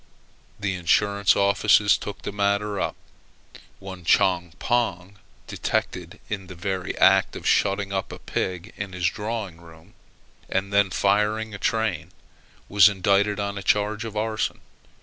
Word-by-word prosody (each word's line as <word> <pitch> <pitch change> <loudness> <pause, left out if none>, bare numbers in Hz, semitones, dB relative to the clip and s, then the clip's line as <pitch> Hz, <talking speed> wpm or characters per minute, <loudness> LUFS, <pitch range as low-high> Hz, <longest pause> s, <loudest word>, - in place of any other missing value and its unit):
The 100 -2 -1
insurance 100 +3 +2
offices 100 +1 +4
took 105 - -7
the - - -4
matter 100 0 0
up. - - -2 0.8
One 95 -2 -10
Chong 85 0 +2
Pong, 100 -5 -1 0.3
detected - - -3
in 95 -3 -5
the 95 - -10
very 95 +1 -4
act - - +4
of - - -8
shutting 100 0 +1
up 95 -1 -3
a - - -7
pig 90 +3 -4
in 100 -2 -6
his 90 -1 -3
drawing 105 -4 -4
room, 80 -1 -17 0.6
and 100 +1 -2
then 100 -1 +4
firing 105 +3 +1
a 100 - -7
train, 100 -8 -1 0.6
was 100 -1 +6
indicted 100 +1 +1
on 100 0 -3
a - - -7
charge 105 +3 0
of 110 -2 -6
arson. 110 0 -2
100 Hz, 145 wpm, -24 LUFS, 95-105 Hz, 0.8 s, was